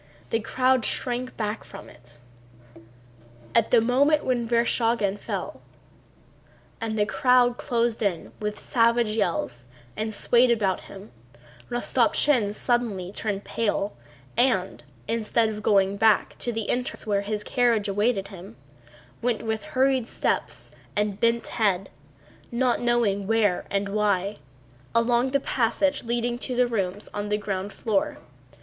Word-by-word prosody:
The 225 Hz, -, +2 dB
crowd 255 Hz, +2 st, +1 dB
shrank 250 Hz, +2 st, -2 dB
back 215 Hz, 0 st, -3 dB
from -, -, -11 dB
it. 120 Hz, -1 st, -14 dB, 1.4 s
At 230 Hz, -1 st, +3 dB
the 240 Hz, -, +6 dB
moment 280 Hz, +6 st, +3 dB
when 240 Hz, -2 st, 0 dB
Vereshchágin 230 Hz, -3 st, +1 dB
fell -, -, -5 dB, 1.2 s
and 220 Hz, -1 st, -2 dB
the 210 Hz, -, +3 dB
crowd 245 Hz, +1 st, +3 dB
closed 235 Hz, -1 st, 0 dB
in 195 Hz, -6 st, -1 dB
with 210 Hz, 0 st, -3 dB
savage 235 Hz, -1 st, +2 dB
yells 170 Hz, -, -2 dB, 0.3 s
and 220 Hz, 0 st, -2 dB
swayed 240 Hz, +4 st, +4 dB
about 205 Hz, -5 st, +1 dB
him, 195 Hz, +1 st, -12 dB, 0.6 s
Rostopchín 240 Hz, -1 st, +2 dB
suddenly 215 Hz, -8 st, -1 dB
turned 205 Hz, -1 st, -3 dB
pale 205 Hz, -2 st, -1 dB, 0.4 s
and, 230 Hz, -7 st, +1 dB, 0.2 s
instead 225 Hz, 0 st, +1 dB
of 215 Hz, -1 st, -5 dB
going 195 Hz, -2 st, +3 dB
to -, -, -5 dB
the 200 Hz, -, -8 dB
back 220 Hz, -2 st, +3 dB, 0.3 s
entrance 250 Hz, +1 st, -1 dB
where 205 Hz, -2 st, +1 dB
his 210 Hz, +1 st, -3 dB
carriage 235 Hz, -5 st, +1 dB
awaited 200 Hz, 0 st, 0 dB
him, 175 Hz, -, -11 dB, 0.7 s
went 235 Hz, -2 st, -1 dB
with 220 Hz, -2 st, -2 dB
hurried 260 Hz, -2 st, +1 dB
steps -, -, -2 dB, 0.2 s
and 210 Hz, -1 st, -1 dB
bent 230 Hz, 0 st, +1 dB
head, 195 Hz, -4 st, 0 dB, 0.6 s
not 245 Hz, 0 st, +1 dB
knowing 230 Hz, -5 st, +1 dB
where 215 Hz, -4 st, +2 dB
and 200 Hz, 0 st, -1 dB
why, 200 Hz, -1 st, 0 dB, 0.6 s
along 240 Hz, +2 st, +3 dB
the 280 Hz, +1 st, +1 dB
passage 265 Hz, +3 st, 0 dB
leading 240 Hz, +1 st, -1 dB
to 255 Hz, -1 st, -3 dB
the 250 Hz, 0 st, +4 dB
rooms 205 Hz, -4 st, -2 dB
on 205 Hz, 0 st, -3 dB
the 210 Hz, -, +1 dB
ground 200 Hz, -1 st, -4 dB
floor. 225 Hz, +9 st, -1 dB
225 Hz, 135 wpm, -25 LUFS, 205-240 Hz, 1.4 s, the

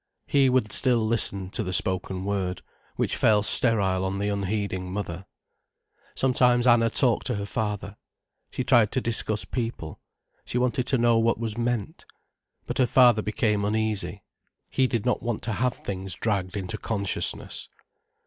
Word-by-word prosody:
He 135 Hz, -2 st, +3 dB
would 125 Hz, -4 st, +1 dB
still 120 Hz, -4 st, +2 dB
listen 100 Hz, -4 st, +2 dB
to 115 Hz, -, -2 dB
the 90 Hz, -4 st, -4 dB
spoken 95 Hz, +1 st, 0 dB
word, 95 Hz, -3 st, -2 dB, 0.3 s
which -, -, -1 dB
fell 105 Hz, -2 st, +3 dB
sterile 100 Hz, -4 st, +2 dB
on 95 Hz, +1 st, -2 dB
the 100 Hz, +1 st, -1 dB
unheeding 100 Hz, -2 st, -3 dB
mother. 95 Hz, -2 st, -5 dB, 0.9 s
Sometimes 125 Hz, -2 st, +2 dB
Anna 120 Hz, -2 st, +4 dB
talked 120 Hz, 0 st, +2 dB
to -, -, -1 dB
her 100 Hz, 0 st, -4 dB
father. 105 Hz, -1 st, -4 dB, 0.5 s
She 130 Hz, -, -3 dB
tried 120 Hz, -5 st, +4 dB
to 130 Hz, -, +1 dB
discuss 110 Hz, -2 st, 0 dB
people, 115 Hz, -10 st, -5 dB, 0.4 s
she -, -, -3 dB
wanted 125 Hz, 0 st, 0 dB
to 130 Hz, -, +1 dB
know 120 Hz, -1 st, +3 dB
what 115 Hz, +1 st, +2 dB
was 110 Hz, -1 st, -3 dB
meant. 120 Hz, -3 st, -3 dB, 0.6 s
But -, -, -4 dB
her 130 Hz, -, +4 dB
father 120 Hz, -4 st, +5 dB
became 105 Hz, -1 st, 0 dB
uneasy. 105 Hz, -1 st, -1 dB, 0.5 s
He 130 Hz, -1 st, +2 dB
did 115 Hz, -3 st, -2 dB
not 125 Hz, -, 0 dB
want 120 Hz, -2 st, -3 dB
to 110 Hz, -, -2 dB
have 125 Hz, +4 st, 0 dB
things 95 Hz, -2 st, -5 dB
dragged 100 Hz, -3 st, -2 dB
into 100 Hz, +3 st, -5 dB
consciousness. 100 Hz, -4 st, -1 dB
110 Hz, 160 wpm, -25 LUFS, 100-120 Hz, 0.9 s, father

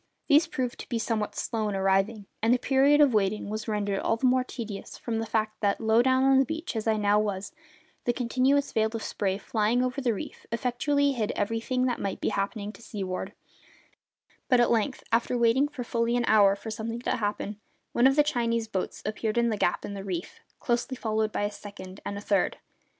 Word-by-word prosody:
These 305 Hz, +2 st, +5 dB
proved 255 Hz, -6 st, -3 dB
to -, -, -8 dB
be 235 Hz, -, -1 dB
somewhat 220 Hz, -2 st, -2 dB
slow 220 Hz, -2 st, -2 dB
in 200 Hz, -, -2 dB
arriving; 195 Hz, +2 st, +1 dB, 0.2 s
and 225 Hz, +2 st, +3 dB
the 250 Hz, -, +5 dB
period 275 Hz, +3 st, +4 dB
of 280 Hz, -4 st, +5 dB
waiting 210 Hz, 0 st, +1 dB
was 215 Hz, 0 st, -4 dB
rendered 205 Hz, -2 st, -1 dB
all 225 Hz, -, +1 dB
the 260 Hz, -, -1 dB
more 255 Hz, 0 st, +4 dB
tedious 220 Hz, -6 st, -7 dB
from 225 Hz, -2 st, -3 dB
the 225 Hz, -, -3 dB
fact 215 Hz, -1 st, -1 dB
that, 200 Hz, -2 st, +1 dB
low 225 Hz, +1 st, +4 dB
down 260 Hz, +1 st, +3 dB
on 270 Hz, 0 st, +5 dB
the -, -, +5 dB
beach 320 Hz, -1 st, -4 dB
as 220 Hz, 0 st, -2 dB
I 220 Hz, -1 st, +3 dB
now 205 Hz, 0 st, +3 dB
was, 205 Hz, +4 st, -3 dB, 0.5 s
the 240 Hz, -, +3 dB
continuous 260 Hz, +3 st, +1 dB
veil 220 Hz, -1 st, +2 dB
of 225 Hz, -, -4 dB
spray 195 Hz, -1 st, -1 dB
flying 220 Hz, +4 st, +1 dB
over 255 Hz, +2 st, -2 dB
the 240 Hz, -4 st, +1 dB
reef -, -, -8 dB
effectually 280 Hz, +5 st, +1 dB
hid 225 Hz, -6 st, -1 dB
everything 230 Hz, +5 st, 0 dB
that 245 Hz, -2 st, -1 dB
might 195 Hz, -1 st, -3 dB
be -, -, 0 dB
happening 205 Hz, +1 st, -2 dB
to 230 Hz, -, -16 dB
seaward; 195 Hz, -5 st, -5 dB, 1.2 s
but 250 Hz, -3 st, +5 dB
at 240 Hz, -, +4 dB
length, 235 Hz, +3 st, 0 dB
after 235 Hz, +2 st, +1 dB
waiting 240 Hz, +4 st, +3 dB
for 290 Hz, -4 st, -6 dB
fully 235 Hz, 0 st, 0 dB
an 240 Hz, -, +1 dB
hour 200 Hz, -2 st, +5 dB
for 220 Hz, +2 st, -7 dB
something 225 Hz, +2 st, -4 dB
to -, -, 0 dB
happen, 205 Hz, -1 st, -3 dB, 0.3 s
one 240 Hz, +2 st, +5 dB
of 270 Hz, -, +3 dB
the 295 Hz, -, +5 dB
Chinese 230 Hz, -5 st, 0 dB
boats 195 Hz, -4 st, -4 dB
appeared 215 Hz, +1 st, -2 dB
in 235 Hz, 0 st, +3 dB
the 220 Hz, -, 0 dB
gap 175 Hz, -, 0 dB
in 205 Hz, -, -5 dB
the 195 Hz, -1 st, -6 dB
reef, 180 Hz, -3 st, -5 dB, 0.2 s
closely 245 Hz, +2 st, -1 dB
followed 220 Hz, -2 st, 0 dB
by -, -, -1 dB
a 205 Hz, -, -1 dB
second 200 Hz, -2 st, -10 dB
and 200 Hz, -, -4 dB
a -, -, -6 dB
third. 200 Hz, -3 st, +1 dB
225 Hz, 215 wpm, -27 LUFS, 205-250 Hz, 1.2 s, These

